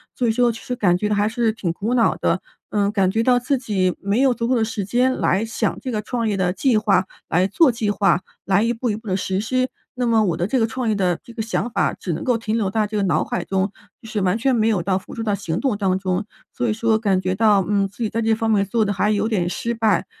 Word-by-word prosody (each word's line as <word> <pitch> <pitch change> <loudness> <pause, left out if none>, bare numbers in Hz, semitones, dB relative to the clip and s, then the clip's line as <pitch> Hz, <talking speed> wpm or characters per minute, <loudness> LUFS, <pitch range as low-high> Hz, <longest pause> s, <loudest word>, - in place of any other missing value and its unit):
所 245 - 0
以 - - +3
说 240 +1 +2
其 225 - -9
实 250 - -4
感 180 -6 +2
觉 210 +2 -1
还 205 +1 +2
是 230 -1 +1
挺 190 -6 -3
苦 220 +7 -2
恼 235 -2 +3
的。 - - 0 0.3
嗯， 205 -1 +1
感 195 -3 +2
觉 220 +3 0
到 245 0 +4
自 265 +3 0
己 195 -7 0
没 200 +4 0
有 265 -2 +4
足 230 0 -2
够 260 - +3
的 225 -2 +2
时 210 -2 -3
间 250 +6 +2
来 200 +4 +1
想 225 - -2
这 255 - -4
个 215 -2 -1
创 230 +1 -2
业 205 - 0
的 180 -2 +1
计 245 +6 +1
划， 200 -3 +2 0.2
来 180 +3 +2
做 270 - +4
计 225 -2 -2
划， 195 -2 +2 0.2
来 195 +2 +2
一 235 +1 +1
步 240 +1 -2
一 210 - -1
步 220 -1 -13
地 185 - 0
实 190 0 -1
施。 255 +4 0 0.2
那 250 -1 -2
么 225 -2 +3
我 175 -4 0
的 175 +1 -1
这 250 +5 0
个 225 - +2
创 245 0 -2
业 215 - +1
的 180 -3 +1
这 235 - -13
个 230 -1 -5
想 230 +2 -2
法 - - 0
只 180 - -5
能 155 - -3
够 245 -3 +2
停 225 0 -2
留 200 -4 0
在 215 +1 +1
这 210 0 -4
个 200 - +1
脑 185 - +2
海 175 - -3
中， 190 +1 0 0.3
就 225 - -11
是 215 - -2
完 190 +2 +1
全 265 +3 +1
没 225 -2 +2
有 205 -6 +2
到 190 0 +1
付 - - -13
诸 225 - -4
到 210 -2 0
行 175 -4 -2
动 255 -7 0
当 190 -2 +1
中， 185 +1 -2 0.3
所 245 - -2
以 215 - +1
说 225 0 +1
感 195 -4 +1
觉 185 0 -1
到， 205 -2 +3
嗯， 200 -1 +2
自 205 +4 -7
己 220 - 0
在 230 - -2
这 225 0 +2
方 225 0 0
面 200 -2 +3
做 220 +3 +1
得 205 - 0
还 205 +2 +1
有 215 +2 0
点 180 -6 0
失 235 +6 -2
败。 220 -2 +1
215 Hz, 310 characters per minute, -21 LUFS, 195-230 Hz, 0.3 s, 到